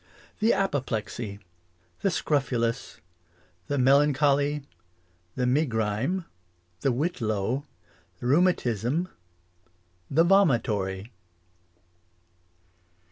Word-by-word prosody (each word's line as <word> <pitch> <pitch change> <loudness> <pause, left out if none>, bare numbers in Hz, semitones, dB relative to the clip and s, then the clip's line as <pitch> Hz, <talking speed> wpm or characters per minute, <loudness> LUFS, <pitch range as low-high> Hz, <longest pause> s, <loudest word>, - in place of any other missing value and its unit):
The 220 +2 +4
apoplexy 120 - -2 0.6
The 195 - +1
scrofulas 130 -8 -1 0.7
The 145 - -1
melancholy 145 +2 +3 0.7
The 125 - 0
megrime 125 - 0 0.5
The 135 - +1
whitlow 125 - -1 0.5
The - - -7
rheumatisme 145 - +2 1.0
The 160 +4 +4
vomitory. 115 - +2
135 Hz, 65 wpm, -27 LUFS, 115-155 Hz, 1.0 s, The